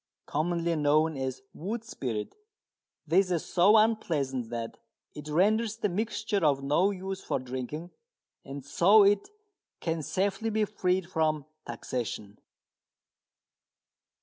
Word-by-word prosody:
Commonly 170 Hz, +2 st, 0 dB
known 155 Hz, +1 st, +3 dB
as 130 Hz, -1 st, -4 dB
"wood 215 Hz, +8 st, -4 dB
spirit," 120 Hz, -, -4 dB, 0.7 s
this 185 Hz, +4 st, +3 dB
is 170 Hz, -3 st, -1 dB
so 195 Hz, +5 st, +5 dB
unpleasant 150 Hz, -, +1 dB
that 115 Hz, -1 st, -5 dB, 0.3 s
it 150 Hz, 0 st, -9 dB
renders 215 Hz, +7 st, +2 dB
the 210 Hz, -3 st, 0 dB
mixture 210 Hz, +1 st, -1 dB
of 140 Hz, -3 st, +3 dB
no 150 Hz, +8 st, +3 dB
use 190 Hz, -1 st, -5 dB
for -, -, -1 dB
drinking, 130 Hz, +6 st, -6 dB, 0.5 s
and 135 Hz, 0 st, -8 dB
so 200 Hz, +9 st, +6 dB
it 200 Hz, -, +3 dB, 0.5 s
can 165 Hz, -1 st, -2 dB
safely 195 Hz, +8 st, -1 dB
be 215 Hz, 0 st, +1 dB
freed 185 Hz, -3 st, 0 dB
from 155 Hz, -4 st, 0 dB, 0.2 s
taxation. 110 Hz, -4 st, -5 dB
170 Hz, 120 wpm, -29 LUFS, 140-200 Hz, 0.7 s, so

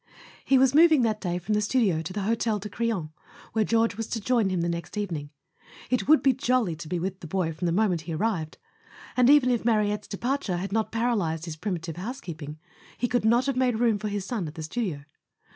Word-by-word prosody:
He 270 Hz, -, +4 dB
was 260 Hz, 0 st, +4 dB
moving 310 Hz, -3 st, +6 dB
that 215 Hz, -2 st, 0 dB
day 175 Hz, -2 st, -1 dB
from 180 Hz, +4 st, -2 dB
the 210 Hz, -, +2 dB
studio 205 Hz, -7 st, +1 dB
to 165 Hz, -, -6 dB
the 205 Hz, +1 st, -3 dB
Hotel 225 Hz, +1 st, 0 dB
de 210 Hz, +1 st, -7 dB
Crillon, 215 Hz, -11 st, -2 dB, 0.4 s
where 220 Hz, 0 st, +2 dB
George 230 Hz, 0 st, +1 dB
was 225 Hz, -1 st, -3 dB
to 230 Hz, -, -3 dB
join 230 Hz, -2 st, +1 dB
him 185 Hz, -2 st, 0 dB
the 170 Hz, -, 0 dB
next 170 Hz, +3 st, -4 dB
eve¬ 205 Hz, -3 st, -2 dB
ning. 145 Hz, -3 st, -4 dB, 0.6 s
It 250 Hz, -, +1 dB
would 300 Hz, -3 st, +5 dB
be 270 Hz, -1 st, +5 dB
jolly 235 Hz, -8 st, +1 dB
to 165 Hz, -1 st, -8 dB
be 180 Hz, +3 st, -2 dB
with 185 Hz, +2 st, -3 dB
the 165 Hz, -, -9 dB
boy 165 Hz, -1 st, -1 dB
from 165 Hz, +3 st, -3 dB
the -, -, +1 dB
moment 180 Hz, -3 st, +1 dB
he 160 Hz, +1 st, -6 dB
arrived; 175 Hz, -5 st, -2 dB, 0.6 s
and, 250 Hz, 0 st, +5 dB
even 280 Hz, -3 st, +6 dB
if 240 Hz, -, 0 dB
Marie 215 Hz, -3 st, +2 dB
tte's 210 Hz, -1 st, -11 dB
departure 230 Hz, -3 st, -2 dB
had 190 Hz, +2 st, -4 dB
not 220 Hz, +1 st, 0 dB
paralyzed 205 Hz, -9 st, 0 dB
his 165 Hz, -3 st, -5 dB
primitive 165 Hz, -2 st, -4 dB
housekeeping, 170 Hz, -, -6 dB, 0.4 s
he 245 Hz, -, 0 dB
could 245 Hz, -2 st, 0 dB
not 240 Hz, +3 st, +4 dB
have 275 Hz, -2 st, 0 dB
made 250 Hz, -3 st, +1 dB
room 230 Hz, -3 st, +2 dB
for 215 Hz, -, -3 dB
his 205 Hz, -2 st, -3 dB
son 205 Hz, -6 st, -3 dB
at 150 Hz, -, -9 dB
the 160 Hz, -, -6 dB
studio. 160 Hz, -4 st, -3 dB
210 Hz, 235 wpm, -26 LUFS, 175-240 Hz, 0.6 s, moving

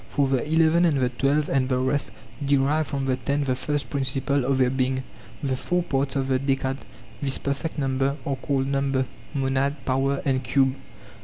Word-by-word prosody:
For 140 Hz, -1 st, +1 dB
the 130 Hz, -2 st, +1 dB
eleven 160 Hz, +1 st, +4 dB
and 155 Hz, -4 st, +3 dB
the 125 Hz, -1 st, +2 dB
twelve 140 Hz, +4 st, +1 dB
and 130 Hz, -1 st, +1 dB
the 130 Hz, -, +2 dB
rest 130 Hz, +3 st, +1 dB, 0.3 s
derive 140 Hz, +2 st, +2 dB
from 135 Hz, -2 st, -2 dB
the 130 Hz, -1 st, +1 dB
ten 140 Hz, +3 st, -1 dB
the 130 Hz, -2 st, +1 dB
first 140 Hz, -1 st, -2 dB
principle 135 Hz, 0 st, +1 dB
of 135 Hz, 0 st, +2 dB
their 130 Hz, -1 st, +3 dB
being. 130 Hz, 0 st, 0 dB, 0.4 s
The 135 Hz, -2 st, 0 dB
four 180 Hz, +7 st, 0 dB
parts 135 Hz, -4 st, -1 dB
of 135 Hz, -1 st, +1 dB
the 130 Hz, -1 st, +2 dB
decad, 135 Hz, -1 st, 0 dB, 0.4 s
this 135 Hz, -2 st, +2 dB
perfect 140 Hz, +4 st, -3 dB
number, 135 Hz, 0 st, 0 dB
are 140 Hz, -, 0 dB
called 135 Hz, 0 st, -1 dB
number, 135 Hz, -1 st, 0 dB, 0.3 s
monad, 135 Hz, +1 st, +1 dB
power, 135 Hz, +1 st, +1 dB
and 130 Hz, -2 st, +1 dB
cube. 130 Hz, +2 st, +2 dB
135 Hz, 185 wpm, -25 LUFS, 130-140 Hz, 0.4 s, eleven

